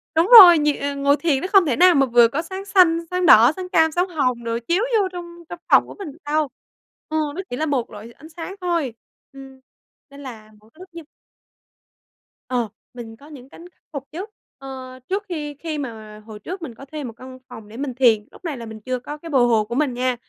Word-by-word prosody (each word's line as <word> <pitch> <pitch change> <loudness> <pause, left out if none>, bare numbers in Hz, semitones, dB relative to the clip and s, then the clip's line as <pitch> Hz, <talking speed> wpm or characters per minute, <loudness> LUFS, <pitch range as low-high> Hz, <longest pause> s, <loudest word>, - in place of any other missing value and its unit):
đúng 330 +3 +3
rồi, 350 -4 +9
nh 285 -1 -2
ngồi 285 +1 +3
thiền 295 -5 0
nó - - -3
không 390 -3 +5
thể 275 -6 0
nào 360 +3 +5
mà 275 -1 +4
vừa 240 -2 +5
có 275 +7 -3
sáng 380 +3 -8
xanh, 360 -4 +4
sáng 360 0 -1
đỏ, 235 -4 +7
sáng 370 -1 -7
cam, 320 -3 +3
sáng 355 +4 -1
hồng 255 -8 -1
đồ 230 0 -3
chiếu 360 +6 +1 0.2
vô 395 - +1
trong 345 -1 -10
trong 350 - -8
phòng - - +5
của - - -11
mình 370 -7 -7
được 295 - -19
đâu, 305 +1 0 0.6
ừ, 315 - -2 0.2
nó 380 - -4
chỉ 245 - -4
là 315 - -1
một 275 -6 -2
loại 215 +3 -11
ánh 315 - -16
sáng 335 +4 -8
thôi. 335 -8 -2 0.4
Ừm, 270 -1 -13 0.5
nên 280 +1 -13
là 220 -5 -11
mỗi 215 +1 -24
cái 310 - -24
lúc 370 0 -13
như 335 -1 -9 1.5
Ờ, 245 -3 -1 0.3
mình 230 -2 -10
có 285 - -17
những 270 -4 -13
cánh 345 +4 -14
khắc - - -43
phục 280 -3 -5
chứ, 350 +6 -6 0.3
ờ, 260 -1 -10
trước 395 +2 -2
khi 300 -4 -5
khi 320 -2 -5
mà 220 -6 -8
hồi 215 -2 -11
trước 365 - -8
mình 270 -8 -8
có 275 - -12
thuê 300 +2 -8
một 240 -3 -7
căn 255 +1 -11
phòng 225 -4 -11
để 220 +2 -12
mình 275 -1 -4
thiền. 230 -5 +3
Lúc - - -17
này 310 -5 -4
là 235 - -8
mình 220 -1 -10
chưa 255 +3 -4
có 295 +5 -8
cái 330 +2 -11
bờ 275 -4 +2
hồ 225 -3 +2
của 235 +3 -6
mình 280 -2 0
nha, 250 +1 -1
280 Hz, 240 wpm, -21 LUFS, 245-335 Hz, 1.5 s, rồi